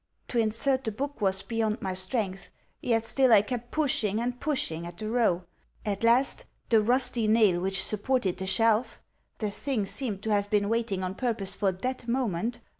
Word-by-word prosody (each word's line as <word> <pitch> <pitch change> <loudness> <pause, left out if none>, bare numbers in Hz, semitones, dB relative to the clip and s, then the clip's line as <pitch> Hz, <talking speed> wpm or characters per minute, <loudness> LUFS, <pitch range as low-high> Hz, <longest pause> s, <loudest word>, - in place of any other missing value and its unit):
To 240 - 0
insert 230 +5 +1
the 220 - -2
book 280 +5 -5
was 190 -1 +1
beyond 220 +1 -1
my 190 -1 -3
strength; 190 0 -2 0.3
yet 230 -2 +1
still 260 +2 +3
I 210 -2 +7
kept 240 +1 -5
pushing 230 -9 0
and 245 +1 -2
pushing 170 - -2
at 175 0 -10
the 215 - -5
row. 220 -7 +2 0.4
At 200 0 -2
last 240 +4 +4 0.2
the 225 -2 +5
rusty 245 0 +1
nail 215 -5 +4
which 190 +1 +2
supported 215 -2 0
the 190 - -4
shelf 225 +3 +2 0.4
(the 210 -2 -2
thing 230 -1 -2
seemed 205 -2 -4
to 220 - -1
have 205 -1 +1
been 205 -1 +1
waiting 225 -5 -1
on 185 0 -2
purpose 215 -4 -1
for 195 -2 +1
that 245 +6 -4
moment!) 235 -2 -1
220 Hz, 185 wpm, -28 LUFS, 195-245 Hz, 0.4 s, I